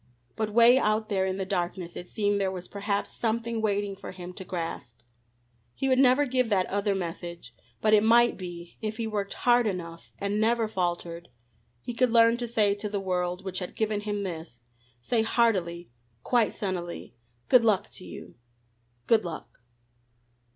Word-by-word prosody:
But 220 -1 -1
'way 235 +4 +6
out 215 -1 +1
there 190 -2 +1
in 190 0 -2
the 190 - -2
darkness 180 -2 -3
it 180 - -7
seemed 205 0 0
there 195 - +1
was 180 -1 -6
perhaps 200 0 -2
something 230 0 -1
waiting 205 -2 0
for 195 - -9
him 180 -1 -8
to 190 - -8
grasp. 165 -10 -5 0.8
He 270 - -1
would 260 -1 +3
never 265 +2 +5
give 255 -2 +1
that 190 -3 +2
other 200 0 +1
message, 170 -1 -6 0.3
but 215 0 +3
it 210 -1 +6
might 235 +2 +5
be, 175 -2 -9
if 215 0 -3
he 230 - -2
worked 205 -2 -3
hard 240 -1 +3
enough, 170 -4 -5
and 200 +2 -1
never 230 0 +2
faltered, 175 -3 -3 0.5
he 245 - -4
could 250 +1 +2
learn 230 0 +5
to 240 0 -3
say 215 -3 +3
to 205 +1 -4
the 205 -1 -2
world 180 -1 -2
which 185 -1 -3
had 180 - -6
given 215 -1 0
him 205 -1 -3
this, 160 -9 -7 0.4
say 225 - +1
heartily, 185 - +1 0.3
quite 240 -3 +2
sunnily: 180 -4 -4 0.3
"Good 250 -2 +6
luck 215 -4 +2
to - - -8
you. - - -10 0.7
Good 225 -2 +4
luck." 170 -2 -8
205 Hz, 175 wpm, -27 LUFS, 180-225 Hz, 0.8 s, way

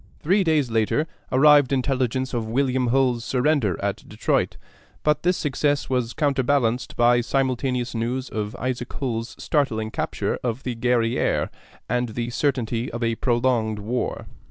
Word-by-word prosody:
Three 190 +5 +2
days 155 -7 +1
later 110 +7 +1 0.3
arrived 145 0 +6
intelligence 130 -1 0
of 115 -2 -2
William 130 +1 +1
Hull's 125 -1 +2
surrender 125 - +1
at - - -2
Detroit; - - 0 0.5
but 150 -1 +2
this 180 +1 +2
success 145 -1 0
was 125 -2 0
counterbalanced 130 -4 +1
by 120 0 +4
simultaneous 130 -1 -1
news 120 +3 -2
of 105 -1 -4
Isaac 125 -1 -3
Hull's 115 -3 -3
startling 110 -8 0
capture - - -2
of 120 +1 -2
the 125 -2 -3
Guerrière, 120 0 +1 0.4
and 125 -1 0
the 120 +2 -3
certainty 120 -3 -1
of 120 +1 -4
a 115 0 +1
prolonged 120 -2 +1
war. 115 +4 -3
125 Hz, 140 wpm, -24 LUFS, 115-135 Hz, 0.5 s, arrived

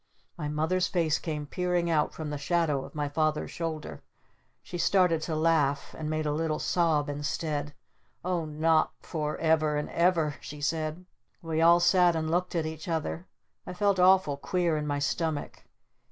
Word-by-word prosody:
My 150 -3 -4
Mother's 160 +5 0
face 165 -4 +1
came 150 -3 -4
peering 180 +2 -1
out 155 -3 +1
from 155 -2 -6
the 145 - -3
shadow 150 -3 0
of - - -12
my 145 -1 -1
Father's 155 +1 -1
shoulder. 160 -2 -5 0.6
She 175 - -6
started 180 -2 +3
to 160 0 -3
laugh. 155 -3 +1
And 155 -1 -4
made 155 0 -1
a 150 - 0
little 155 0 -1
sob 160 -4 +1
instead. 145 0 -3 0.5
"Oh 180 -3 0
not 155 +1 +2
for 150 -2 -3
ever 155 -2 +2
and 150 - -3
ever?" 170 -4 +2
she 150 - -8
said. 155 +4 -2 0.4
We 160 -1 -1
all 170 +1 +6
sat 175 -1 +4
and 160 0 -1
looked 180 +1 0
at 165 -2 0
each 160 +1 -6
other. 165 +1 -3 0.4
I - - -5
felt 200 0 +1
awful 185 -5 +4
queer 175 +2 0
in 150 0 -2
my 145 -1 0
stomach. 150 +1 -2
160 Hz, 170 wpm, -28 LUFS, 150-170 Hz, 0.6 s, all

